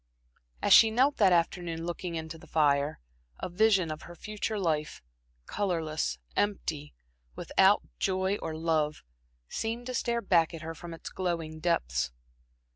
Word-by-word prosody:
As -, -, +6 dB
she 225 Hz, -, +9 dB
knelt 260 Hz, +6 st, +2 dB
that 195 Hz, -3 st, +5 dB
afternoon 170 Hz, -1 st, 0 dB
looking 175 Hz, 0 st, -4 dB
into 160 Hz, 0 st, -6 dB
the -, -, -15 dB
fire, 145 Hz, -1 st, +2 dB, 0.4 s
a -, -, -3 dB
vision 190 Hz, -3 st, +3 dB
of 155 Hz, -, -6 dB
her 175 Hz, -, -11 dB
future 215 Hz, +2 st, -4 dB
life 155 Hz, -, -1 dB, 0.4 s
colorless, 160 Hz, -, -1 dB, 0.2 s
empty, 160 Hz, -8 st, -2 dB, 0.4 s
without -, -, +3 dB, 0.2 s
joy 190 Hz, +1 st, +1 dB
or 160 Hz, -4 st, -5 dB
love 155 Hz, -2 st, 0 dB, 0.4 s
seemed 230 Hz, -, -3 dB
to 255 Hz, -, -4 dB
stare 235 Hz, -1 st, 0 dB
back 170 Hz, -3 st, +3 dB
at 160 Hz, -, -9 dB
her 165 Hz, +1 st, -5 dB
from 165 Hz, +1 st, -8 dB
its -, -, -9 dB
glowing 165 Hz, -4 st, -3 dB
depths. 65 Hz, -, 0 dB
170 Hz, 145 wpm, -29 LUFS, 155-195 Hz, 0.4 s, she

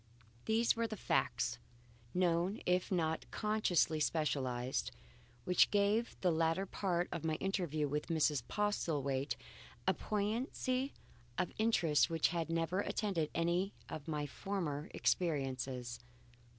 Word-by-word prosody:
These 225 Hz, +1 st, +3 dB
were 230 Hz, 0 st, 0 dB
the 215 Hz, -1 st, -5 dB
facts, -, -, 0 dB, 0.5 s
known 180 Hz, +2 st, +1 dB
if 180 Hz, +2 st, +1 dB
not 160 Hz, -3 st, 0 dB
consciously 210 Hz, -7 st, +2 dB
specialized, 130 Hz, -, 0 dB, 0.5 s
which 180 Hz, +5 st, +5 dB
gave 210 Hz, +3 st, +2 dB
to -, -, -20 dB
the 180 Hz, -, +3 dB
latter 165 Hz, +3 st, +2 dB
part 180 Hz, -2 st, 0 dB
of 165 Hz, -, -3 dB
my 160 Hz, -1 st, +1 dB
interview 170 Hz, -5 st, -1 dB
with 150 Hz, +1 st, -2 dB
Mrs. 155 Hz, -4 st, +2 dB
Postlethwaite 145 Hz, -10 st, 0 dB, 0.5 s
a -, -, +5 dB
poignancy 250 Hz, +5 st, -1 dB, 0.4 s
of 180 Hz, -, 0 dB
interest 175 Hz, -9 st, +3 dB
which 165 Hz, -1 st, +2 dB
had 165 Hz, -1 st, -2 dB
never 165 Hz, +3 st, 0 dB
attended 195 Hz, -7 st, 0 dB
any 175 Hz, +4 st, +1 dB
of 150 Hz, -1 st, -6 dB
my 150 Hz, -2 st, -1 dB
former 155 Hz, -2 st, -3 dB
experiences. 130 Hz, -7 st, -1 dB
170 Hz, 125 wpm, -36 LUFS, 150-200 Hz, 0.5 s, which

